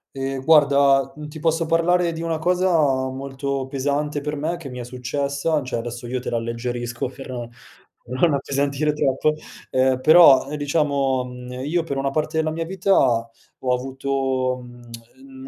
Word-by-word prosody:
Ehm 135 0 -3
guarda, 140 -3 +4
mhmm, 150 0 -8
ti 155 +1 -9
posso 165 +1 +1
parlare 170 +1 +2
di 165 - -6
una 165 -1 -1
cosa 180 +3 +1 0.4
molto 135 0 -4
pesante 145 +2 -2
per 150 +1 -3
me 160 +4 -2
che 160 -5 -9
mi 125 - -8
è 125 - -5
successa, 140 +5 -2
cioè 130 -2 -3
adesso 120 +1 -6
io 125 +2 -2
te 125 - -5
l'alleggerisco, 120 +1 -3
per 135 +1 -10
non 120 -2 -5 0.6
per 125 +2 -6
non 165 -1 +4
appesantire 140 +2 0
troppo 150 0 +1 0.4
eh 130 0 +2
però 155 -3 +7
diciamo, 140 -3 0 0.3
ehm, 125 +1 -6
io 170 +4 +1
per 140 -4 -4
una 135 0 -1
parte 155 +2 -1
della 155 0 +1
mia 165 +1 -3
vita 190 +2 0 0.7
ho 125 - +2
avuto, 130 0 -1
mhmm, 120 - -13
140 Hz, 165 wpm, -22 LUFS, 130-155 Hz, 0.7 s, però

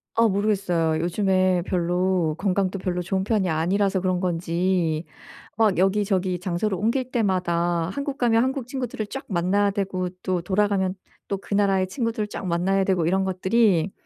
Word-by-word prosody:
아 230 0 +4
모르겠어요. 190 -6 +1
요즘에 185 0 +2
별로 180 -2 0
건강도 195 -1 0
별로 180 -1 -2
좋은 190 +1 -1
편이 200 -4 +1
아니라서 190 +5 +1
그런 185 -1 0
건지 170 -2 0 0.5
막 215 -5 +3
여기저기 190 -2 +1
장소를 185 +2 -1
옮길 250 +5 -1
때마다 175 -6 0
한국 280 +4 -4
가면 230 -1 +3
한국 260 -2 -2
친구들을 250 -5 -4
쫙 270 - -6
만나야 195 +3 +1
되고 190 -2 -2
또 185 -2 0
돌아가면 190 0 +1 0.3
또 200 - -2
그 200 - -7
나라의 195 -2 +2
친구들을 225 -1 -2
쫙 195 - -6
만나야 190 +3 +1
되고 180 -4 +1
이런 190 +2 +1
것들이 190 -1 +2
190 Hz, 350 characters per minute, -24 LUFS, 180-205 Hz, 0.5 s, 아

